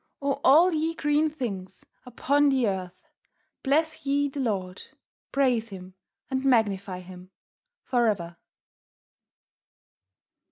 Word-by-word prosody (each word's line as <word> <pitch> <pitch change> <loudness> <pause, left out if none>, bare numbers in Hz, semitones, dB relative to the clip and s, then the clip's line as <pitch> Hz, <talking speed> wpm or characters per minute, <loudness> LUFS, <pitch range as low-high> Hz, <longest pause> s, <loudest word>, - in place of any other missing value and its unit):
O 275 0 -2
All 330 +7 +6
ye 320 +1 -1
Green 295 +1 +1
Things 200 -11 -6 0.2
upon 285 +4 +2
the 260 -4 +2
Earth, 185 -2 -5 0.5
Bless 315 +3 0
ye 285 +1 +1
the 280 - -7
Lord; 195 -7 -2 0.5
Praise 250 -5 +1
Him, 185 -1 -10 0.3
and 265 -1 -2
Magnify 200 -7 +1
Him 180 0 -12 0.5
for 240 -2 +1
ever." 170 -5 -2
250 Hz, 110 wpm, -26 LUFS, 190-285 Hz, 0.5 s, All